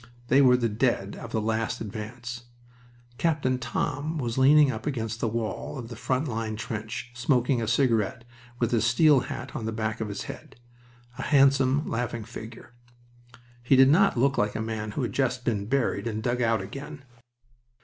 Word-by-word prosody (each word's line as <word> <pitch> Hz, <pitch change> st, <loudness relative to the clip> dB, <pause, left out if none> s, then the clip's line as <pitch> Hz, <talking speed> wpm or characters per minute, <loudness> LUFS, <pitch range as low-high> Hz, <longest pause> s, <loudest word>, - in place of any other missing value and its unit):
They 135 Hz, +2 st, +6 dB
were 125 Hz, -2 st, +6 dB
the 120 Hz, -2 st, +1 dB
dead 110 Hz, -3 st, 0 dB
of 115 Hz, -, -9 dB
the 110 Hz, -, 0 dB
last 110 Hz, +1 st, -1 dB
advance. 115 Hz, +3 st, -7 dB, 0.7 s
Captain 140 Hz, -6 st, +1 dB
Thom 145 Hz, +4 st, -2 dB
was 120 Hz, -5 st, -2 dB
leaning 140 Hz, +1 st, +6 dB
up -, -, -6 dB
against 115 Hz, -5 st, -3 dB
the 115 Hz, -, 0 dB
wall 115 Hz, +4 st, -3 dB
of 120 Hz, -3 st, -7 dB
the 120 Hz, -, -7 dB
front 130 Hz, +5 st, -1 dB
line 110 Hz, -3 st, -3 dB
trench, 110 Hz, +2 st, -5 dB
smoking 125 Hz, 0 st, +1 dB
a 110 Hz, -, -2 dB
cigarette, 115 Hz, -2 st, +1 dB, 0.3 s
with 120 Hz, -1 st, 0 dB
his 115 Hz, -3 st, +2 dB
steel 140 Hz, +4 st, +5 dB
hat 125 Hz, +1 st, -6 dB
on 110 Hz, -, -4 dB
the -, -, -1 dB
back 110 Hz, +1 st, -3 dB
of 110 Hz, -, -2 dB
his 100 Hz, -, -5 dB
head -, -, -10 dB, 0.6 s
a -, -, -2 dB
handsome, 135 Hz, 0 st, +3 dB
laughing 115 Hz, -1 st, -3 dB
figure. 115 Hz, +2 st, -10 dB, 0.9 s
He 125 Hz, +3 st, +3 dB
did 135 Hz, 0 st, +7 dB
not 185 Hz, +1 st, +4 dB
look 135 Hz, +3 st, +2 dB
like 105 Hz, 0 st, 0 dB
a -, -, -2 dB
man 110 Hz, -1 st, -3 dB
who 135 Hz, -, -2 dB
had 120 Hz, -, -3 dB
just 130 Hz, -2 st, -1 dB
been 105 Hz, -3 st, -1 dB
buried 130 Hz, -1 st, 0 dB
and 110 Hz, -1 st, -3 dB
dug 125 Hz, +1 st, 0 dB
out 115 Hz, -4 st, +1 dB
again. 140 Hz, +7 st, -8 dB
120 Hz, 180 wpm, -26 LUFS, 110-135 Hz, 0.9 s, did